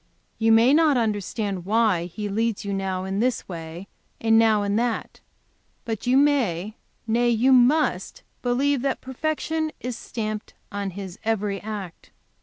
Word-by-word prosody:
You 225 0 +3
may 230 +4 +6
not 305 -3 +4
understand 205 -3 -2
why 205 -3 +2
He 205 +4 -5
leads 220 +1 -1
you 200 - -2
now 190 -1 -2
in 190 +1 -2
this 245 +1 0
way 170 +1 -7 0.3
and 225 0 +4
now 220 -2 +4
in 200 0 0
that, 235 0 -2 0.7
but 225 +1 -4
you 255 +2 +4
may, 220 - +2 0.3
nay, 235 +2 +2
you 240 +3 +4
must 260 +5 +2 0.2
believe 265 +2 +1
that 270 0 -1
perfection 310 +4 -2
is 250 -1 -4
stamped 215 -2 -5 0.2
on 200 -1 -3
His 190 -2 -7
every 210 -3 -1
act. 205 -5 -7
225 Hz, 150 wpm, -24 LUFS, 200-245 Hz, 0.7 s, may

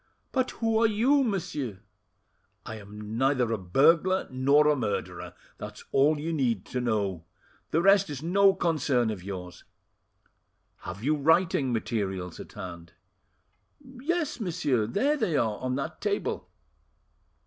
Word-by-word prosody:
"But 260 -1 0
who 225 -1 +1
are - - +6
you, 250 +7 +3
monsieur?" 165 - -3 0.8
"I 110 - -6
am 105 +2 -7
neither 130 -3 +2
a - - 0
burglar 165 - +3
nor 140 +4 +4
a 150 - +4
murderer; 90 - -4 0.2
that's - - -9
all 145 +3 +3
you 165 +3 -3
need 120 - 0
to 125 - 0
know; 100 -8 -1 0.4
the 165 +2 +1
rest 195 -1 +5
is 145 -1 -6
no 195 +3 +4
concern 145 - +1
of 95 -4 -7
yours. 90 -2 -7 1.1
Have 95 +5 -8
you 150 +4 +2
writing 150 -2 +2
materials 95 -6 -3
at - - -10
hand?" 85 -4 -9 0.9
"Yes, 290 +5 -3
monsieur; 150 - 0
there 275 - +1
they 190 - 0
are, 110 -2 0
on 130 0 -2
that 155 +4 -5
table." 205 -1 -2
140 Hz, 135 wpm, -27 LUFS, -, 1.1 s, are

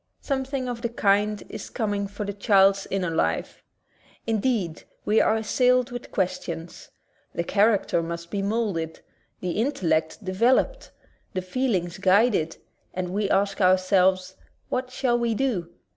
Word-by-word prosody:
Something 265 -1 -2
of 240 -1 -4
the 235 - -1
kind 210 -2 +1
is - - -8
coming 205 -4 -2
for 205 +1 -6
the 200 - -3
child's 195 -1 +3
inner 185 -3 -1
life. 160 - -1 0.6
Indeed, 220 -7 0 0.2
we 215 +1 +4
are 220 - +3
assailed 250 +3 +2
with 245 0 -7
questions. 175 -3 -3 0.5
The 170 - 0
character 200 -2 +2
must 170 +1 -6
be 200 - -1
molded, 200 -6 -2 0.4
the 180 - -2
intellect 185 - 0
developed, 240 - +1 0.5
the 185 - -1
feelings 185 -4 -1
guided, 190 -4 +3 0.4
and 180 -1 -2
we 200 +2 -1
ask 200 +1 +1
ourselves. 185 0 +3 0.4
What 255 0 -2
shall 245 -2 0
we 235 -1 0
do? 210 -10 -1
200 Hz, 135 wpm, -25 LUFS, 185-235 Hz, 0.6 s, we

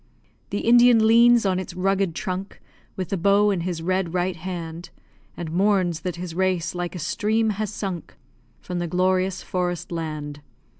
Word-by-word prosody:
The 205 - -2
Indian 240 -1 +6
leans 235 0 +6
on 185 -1 +1
its 185 -1 -7
rugged 190 -2 0
trunk, 190 0 -4 0.4
With 185 -2 -4
the 195 - -1
bow 200 +3 +4
in 190 - 0
his 170 -2 -3
red 185 -1 -1
right 180 0 0
hand, 170 -1 -6 0.5
And 165 -2 -5
mourns 185 -2 +2
that 180 +1 -4
his 175 -1 -6
race, 185 -2 0
like 175 0 -4
a - - -4
stream, 215 +6 0
has 210 0 -3
sunk 190 -5 -5 0.5
From 180 -1 -4
the 175 - -2
glorious 185 +1 0
forest 180 -1 -3
land. 155 -3 -5
185 Hz, 165 wpm, -23 LUFS, 175-200 Hz, 0.5 s, Indian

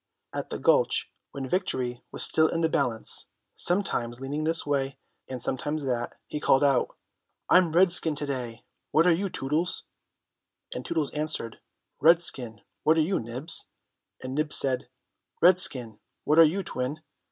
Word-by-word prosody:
At - - -5
the - - -5
Gulch, - - +1 0.2
when 135 -1 -7
victory 130 -8 -2
was - - +2
still 160 0 +6
in 165 - -3
the 160 - +1
balance, 125 -7 +1 0.3
sometimes 125 -11 0
leaning 145 +3 -4
this 165 +1 0
way 140 -2 -2 0.3
and 130 -1 -6
sometimes 145 +5 -2
that, 120 -3 -3
he 150 - -6
called 135 -1 +2
out, 135 -3 +1 0.5
"I'm 180 -2 +5
redskin 170 -2 +5
to 145 - -4
day; 125 -5 -6 0.3
what 160 +2 +2
are 180 - +5
you, 195 +4 -2
Tootles?" 155 +5 -2 0.9
And 125 - -6
Tootles 155 -3 -2
answered, 150 -7 -2 0.4
"Redskin; 135 - +1 0.2
what 160 +1 +2
are - - +4
you, 180 +5 -1
Nibs?" 125 +8 -3 0.6
and 130 0 -6
Nibs 150 +1 +2
said, 130 -2 +2 0.5
"Redskin; 130 - +3 0.2
what 155 +2 +2
are 165 - +9
you 185 +6 -1
Twin?" 130 +3 -5
150 Hz, 150 wpm, -26 LUFS, 130-165 Hz, 0.9 s, are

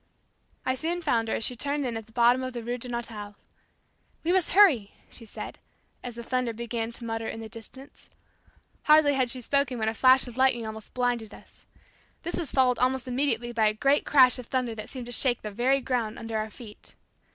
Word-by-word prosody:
I 260 - +1
soon 335 +6 -2
found 230 -7 +1
her - - 0
as - - -2
she 250 - +1
turned 285 +3 -1
in 240 -2 -2
at 225 -1 -6
the - - -20
bottom 240 +2 +4
of 255 0 -4
the 240 -1 -5
Rue 245 +2 -3
Darnetal. 230 -4 -5 0.9
"We 335 - +1
must 375 -2 +3
hurry," 305 - +5 0.2
she 230 - -9
said - - -8 0.4
as 245 -2 -6
the 235 - -7
thunder 250 -1 -1
began 230 0 -4
to 235 - -6
mutter 225 0 -3
in 225 - -5
the 225 - -7
distance. 230 +5 -8 0.8
Hardly 305 -1 +6
had 260 -2 +1
she 255 +1 -3
spoken 280 0 0
when 220 -1 0
a - - -3
flash 260 +3 +5
of 245 0 -10
lightning 260 -3 +3
almost 220 0 -9
blinded 245 -4 -1
us. - - -18 0.6
This 345 - -2
was 320 -6 -3
followed 255 -2 +3
almost 255 0 +1
immediately 245 -2 0
by 225 -2 +2
a 215 - +1
great 275 +6 +2
crash 255 -3 +5
of 245 - -9
thunder 255 -3 -1
that 215 0 -7
seemed 255 -3 -6
to 245 - -8
shake 245 0 +2
the 210 - -5
very 255 +6 +2
ground 240 -4 -2
under 225 0 -6
our 215 0 -3
feet. 215 -1 -10
245 Hz, 215 wpm, -27 LUFS, 225-260 Hz, 0.9 s, Hardly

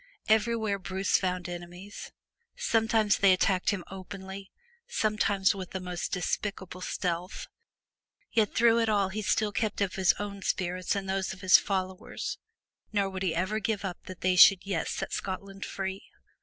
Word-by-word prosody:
Everywhere 220 -2 +2
Bruce 190 +1 +1
found 180 -1 -2
enemies. 175 +3 -8 0.4
Sometimes 225 - +2
they 195 -2 +6
attacked 185 0 +2
him 195 -4 -1
openly, 190 +1 -8 0.4
sometimes 205 -3 +2
with 190 -2 -7
the 190 - -2
most 180 -1 -4
despicable 190 0 -3
stealth. 180 0 -3 0.9
Yet 220 -3 +1
through 230 0 +5
it 225 -1 +2
all 200 -3 +2
he 210 +3 -4
still 210 +1 +1
kept 215 0 -1
up 200 -2 0
his 190 -2 +4
own 200 -1 -6
spirits 185 0 -1
and 195 -1 -3
those 190 0 -1
of 185 - -12
his 185 -1 +7
followers; 190 -1 -3 0.5
nor 200 -2 0
would 190 -1 -5
he 180 -4 0
ever 190 +5 0
give 210 -1 -2
up 180 -2 -4
hope - - -38
that 185 -2 -9
they 185 0 +2
should 180 +1 +8
yet 195 -4 -1
set - - -4
Scotland 195 +1 -4
free. 190 0 -4
195 Hz, 165 wpm, -29 LUFS, 185-205 Hz, 0.9 s, should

